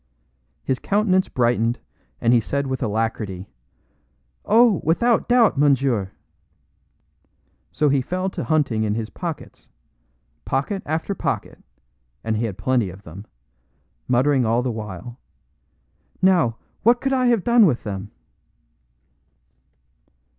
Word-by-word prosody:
His 130 -1 -1
countenance 195 -2 +1
brightened, 120 -1 +1 0.4
and 115 - +3
he 120 - +5
said 140 +5 -2
with 130 -1 -3
alacrity: 110 -4 -2 1.0
"Oh, 225 -3 +4
without 230 +9 +2
doubt, 235 - +4
monsieur!" 135 -8 +2 1.6
So 150 - +1
he 140 -1 +2
fell 185 +7 -2
to - - -4
hunting 145 -9 +1
in 105 -1 0
his 110 -1 -4
pockets 170 -4 -7 0.7
pocket 140 +9 -2
after 160 +6 -2
pocket, - - -3 0.6
and 110 0 -1
he 115 +2 -1
had 100 -5 -5
plenty 125 -6 0
of 95 +3 -12
them 95 +6 -11 0.8
muttering 130 +2 +3
all 115 +2 +1
the 125 - -1
while, 110 +2 -7 1.0
"Now, 175 -12 +3 0.2
what 240 +3 +4
could 270 0 -1
I 255 -1 +2
have 235 -6 +2
done 235 -3 +5
with 125 -7 -1
them?" 100 0 -5
130 Hz, 120 wpm, -22 LUFS, 110-185 Hz, 1.6 s, he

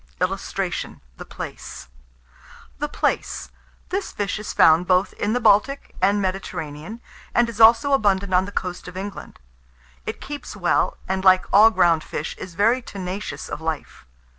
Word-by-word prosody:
[Illustration: - - -3 0.2
THE - - -9
PLAICE.] - - -8 0.9
THE 295 +1 -2
PLAICE. - - -2 0.4
This 390 +1 -3
fish 205 0 -3
is 210 - -5
found 165 +3 +5
both 185 +1 +2
in 210 +1 -1
the 245 - +1
Baltic 230 +5 +2
and 200 +2 +3
the - - 0
Mediterranean, 185 +1 -5 0.3
and 240 0 +4
is 230 -1 -4
also 235 +6 +6
abundant 200 -6 +2
on 180 +1 +4
the 200 - -8
coast 180 -3 -4
of 180 +1 -9
England. 200 +1 -7 0.7
It - - -4
keeps 290 0 -7
well, - - +1
and, 190 0 -1
like 185 -1 +5
all 215 +3 +8
ground 170 -7 +3
fish, 150 - -5
is 180 -2 -8
very 225 +7 +3
tenacious 195 -2 -6
of - - -6
life. 160 - -5
200 Hz, 160 wpm, -22 LUFS, 180-225 Hz, 0.9 s, all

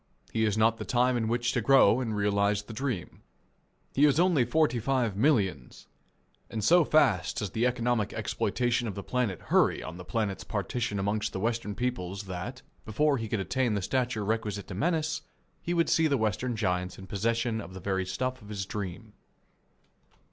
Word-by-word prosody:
He 110 0 +2
has 105 -1 0
not 115 +1 +3
the - - -5
time 125 +1 +2
in 115 -2 0
which 120 +1 0
to - - 0
grow 135 -4 +5
and 115 -4 -2
realize 100 0 +1
the 110 - -10
dream. 120 - -4 0.7
He 145 - +5
is 145 +1 +3
only 175 -7 +4
forty 125 -1 +2
five 120 -3 0
millions, 100 - 0 0.6
and 110 -2 -4
so 175 - +6
fast 110 - +2
does 100 -4 -2
the 115 +3 +1
economic 120 -3 0
exploitation 120 -1 -1
of 105 - -4
the 100 - -5
planet 120 -8 -1
hurry - - +2
on 80 - -7
the 90 - -8
planet's 105 -1 -2
partition 120 -4 -2
amongst 105 +2 -1
the - - -3
Western 115 -1 -2
peoples 100 -5 -3
that, 95 +8 -6 0.2
before 140 +7 +1
he 115 - -4
could 110 - -1
attain 120 +3 0
the 100 - -1
stature 125 -2 -1
requisite 105 -2 -2
to - - -5
menace, 160 -1 0 0.4
he 175 - -2
would 165 -1 +2
see 160 -1 +3
the 140 -2 +2
Western 110 +2 -1
giants 90 -4 -1
in 95 - -10
possession 115 +3 -1
of 90 +2 -10
the - - -6
very 95 0 -1
stuff 130 +7 -3
of 105 - -13
his 100 -3 -4
dream. 105 +2 -6
110 Hz, 185 wpm, -29 LUFS, 100-125 Hz, 0.7 s, so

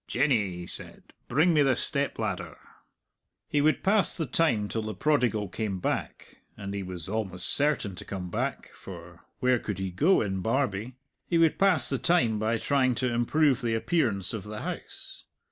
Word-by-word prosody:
"Jenny," 120 -6 +2
he 90 0 -7
said, - - -8
"bring 165 +4 +3
me 150 - +4
the 135 -3 +3
step - - 0
ladder." - - -4 0.9
He 145 - +1
would 155 +1 +2
pass 200 +1 +2
the 165 - -1
time 120 -7 +1
till 110 - -3
the 110 0 -5
prodigal 125 -9 +1
came 100 0 -3
back - - -4 0.2
and 100 0 -6
he 100 - -3
was 90 -3 -2
almost 95 -4 0
certain 145 -9 +1
to - - -6
come 90 -3 -6
back, - - -3
for 85 -2 -11 0.2
where 125 -2 +3
could 105 -4 -4
he 95 -1 -3
go 160 - +3
in 95 -3 -2
Barbie? 115 0 -1 0.3
he 170 - +1
would 165 -2 +3
pass 185 -9 +4
the 135 - -1
time 120 -12 +2
by 110 +2 +1
trying 130 0 +1
to 125 0 -1
improve 135 +3 +2
the 115 -2 0
appearance 115 - 0
of 110 -4 -4
the 105 0 -7
house. - - -7
115 Hz, 180 wpm, -28 LUFS, 100-145 Hz, 0.9 s, me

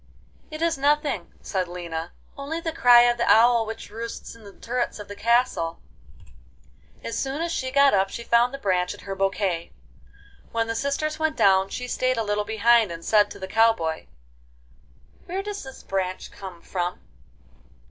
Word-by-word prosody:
'It 310 0 -5
is 335 -4 +1
nothing,' 285 - +1
said 185 -2 -2
Lina; 170 -1 -5 0.2
'only 285 +4 -4
the 330 -1 -3
cry 245 -6 +7
of 240 0 +3
the 235 - +3
owl 230 0 +5
which 225 -2 -7
roosts 230 +2 -7
in 230 -1 -16
the 200 - -11
turrets 245 +4 -3
of 210 - -9
the 205 - -8
castle.' 230 -8 +1
XI - - -25 0.8
As 230 - -3
soon 270 +2 -2
as 335 +1 -2
she 260 -5 -2
got 280 +1 +4
up 195 -1 +2
she 235 - -6
found 235 +1 +3
the 275 - -6
branch 180 -7 0
in - - -15
her 195 - -5
bouquet. 195 -3 -1 0.8
When 230 0 0
the 230 - -3
sisters 280 +5 -2
went 315 -1 0
down 190 0 +4
she 250 +4 -5
stayed 255 0 0
a 225 - 0
little 205 0 -1
behind 220 -1 +3
and 165 0 -8
said 210 -1 +4
to - - -10
the 190 - -6
cow 225 +3 +4
boy: 160 -5 -4 1.2
'Where 380 +3 -3
does 410 0 -5
this 265 -1 -11
branch 185 -1 -3
come 185 -3 -10
from? 175 -1 -3
225 Hz, 185 wpm, -24 LUFS, 190-265 Hz, 1.2 s, cry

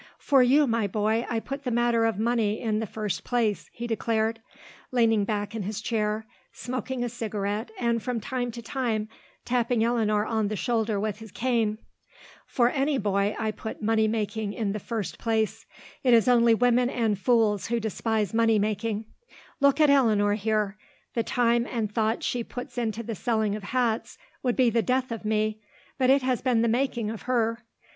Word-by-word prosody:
"For 275 -2 +4
you, 275 +4 +5
my 230 -4 +1
boy, 215 +3 0
I 230 - 0
put 275 +5 -6
the 255 - -1
matter 235 -1 +2
of 225 -3 0
money 220 -1 +1
in 215 -2 -1
the 225 - -3
first 210 -1 -3
place," 230 -4 0
he 240 - -6
declared, 225 -1 -1 0.5
leaning 225 -4 +3
back 205 0 -2
in 225 - -3
his 205 +2 -4
chair, 215 -1 -1 0.3
smoking 255 0 -4
a - - -1
cigarette 215 -2 -3
and 235 -1 0
from 245 -1 -2
time 250 +1 -3
to 235 0 -8
time 230 -4 -2 0.4
tapping 240 -2 +1
Eleanor 215 -3 +1
on 220 -2 0
the 215 - -2
shoulder 220 -1 0
with 210 0 -2
his 220 -2 -11
cane. 230 -4 0 0.7
"For 240 -1 +2
any 275 +1 +1
boy 200 -1 0
I 220 -1 -1
put 220 0 -7
money 220 0 +3
making 215 -1 -2
in 210 -3 -2
the 215 - -3
first 210 -3 -4
place. 220 -2 -1 0.4
It 250 -3 +6
is 230 +2 +4
only 235 -2 +5
women 245 +1 +3
and 225 -5 0
fools 210 -1 +2
who 235 0 0
despise 220 -1 -1
money 225 -1 +3
making. 215 +1 -1 0.5
Look 280 0 +4
at 300 -2 +6
Eleanor 215 -7 +4
here. 210 -1 -1 0.3
The 235 - +1
time 235 0 +1
and 220 -4 -2
thought 220 +1 0
she 245 -1 -1
puts 245 +2 -8
into 230 -2 -2
the 230 - -4
selling 220 -1 0
of 210 -2 -7
hats 235 0 -1 0.2
would 245 -2 0
be 250 -3 +3
the 230 +1 +2
death 255 +4 0
of 225 -2 -5
me, 215 0 0 0.4
but 260 -1 +3
it 270 0 +5
has 255 -2 0
been 245 -3 +2
the - - +3
making 235 -2 0
of 225 - -7
her. 230 -2 +1
225 Hz, 185 wpm, -26 LUFS, 215-240 Hz, 0.7 s, It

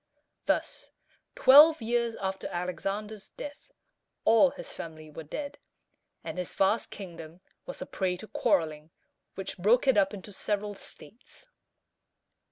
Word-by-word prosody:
Thus, - - -1 0.5
twelve 300 +4 +8
years 235 0 0
after 190 0 -4
Alexander's 195 +4 -4
death, 290 +11 -10 0.5
all 230 +5 +6
his - - -10
family 155 -2 -9
were 155 - -8
dead, 285 - -6 0.6
and - - -5
his 180 - -5
vast 195 +4 +2
kingdom 170 -4 -9 0.3
was - - -6
a - - -9
prey 185 -2 -2
to 220 - -10
quarreling, 160 -10 0 0.5
which 195 -1 -6
broke 220 +9 +4
it 260 -6 +5
up 195 -1 +2
into 205 0 -9
several 205 +1 -2
states. 225 - -15
200 Hz, 130 wpm, -29 LUFS, 180-235 Hz, 0.6 s, twelve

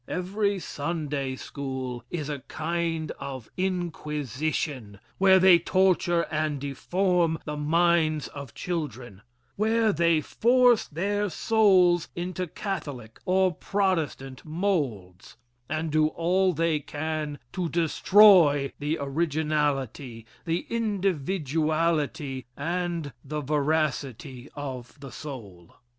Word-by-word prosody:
Every 200 +3 -1
Sunday 145 -5 -3
school 130 -3 -5
is 155 -5 -4
a 145 -2 -4
kind 165 0 -2
of 130 -4 -7
inquisition 150 - -3 0.2
where 190 0 +6
they 185 -2 +7
torture 175 -1 +2
and 155 -2 -1
deform 170 +4 0
the 150 - -4
minds 155 -1 +2
of 140 -5 -9
children 130 - -5 0.4
where 220 +1 +2
they 170 0 +3
force 240 - +3
their 205 +6 -1
souls 185 -4 +3
into 180 +1 -3
Catholic 145 - -6
or 185 0 +3
Protestant 160 -11 -2
moulds 140 - -3 0.3
and 155 +1 -2
do 155 0 +3
all 180 +4 +1
they 165 -1 +1
can 150 0 -4 0.2
to 180 -3 -2
destroy 170 -4 +5
the 150 +3 -1
originality, 140 -5 -1 0.2
the 165 +1 -1
individuality, 160 - -1
and 170 -2 -2
the 150 +2 -4
veracity 140 -4 -1
of 135 -2 -7
the 135 -2 -9
soul. 105 - -9
155 Hz, 100 wpm, -26 LUFS, 140-180 Hz, 0.4 s, they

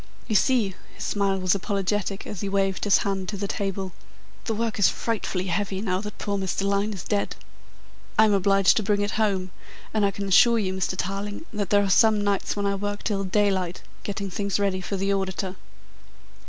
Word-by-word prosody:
"You 220 - -1
see," 225 -4 +3 0.2
his - - -7
smile 200 -2 +1
was 185 -1 +2
apologetic 200 0 -1
as 205 - -6
he 200 - -2
waved 195 -1 0
his 205 - +5
hand 195 -2 -1
to 205 - -4
the 200 +1 -2
table, 195 -1 -3 0.5
"the 225 - -1
work 225 0 -2
is 200 - +6
frightfully 200 -5 -2
heavy 190 +2 -1
now 190 -2 -1
that 210 -1 -7
poor 200 -1 -2
Mr. 190 0 -1
Lyne 200 +2 +1
is 190 -5 -6
dead. 205 -1 -1 0.8
I 220 - +7
am 210 - +3
obliged 195 0 +4
to - - +3
bring 205 0 +1
it 205 0 0
home, 190 -4 0 0.4
and 215 -1 +2
I 200 - +4
can 200 0 -4
assure 235 +5 +6
you, 190 -4 0
Mr. 190 -1 -1
Tarling, 200 - -3
that 205 -3 -2
there 205 0 +4
are - - 0
some 220 +2 +5
nights 200 -1 0
when 205 0 -1
I 200 - +2
work 205 +1 -3
till 200 -3 0
daylight, 190 -2 0 0.2
getting 200 -1 -4
things 200 +1 -1
ready 195 -2 0
for 195 +2 -3
the 195 +1 +1
auditor." 190 -1 -2
200 Hz, 205 wpm, -25 LUFS, 190-205 Hz, 0.8 s, I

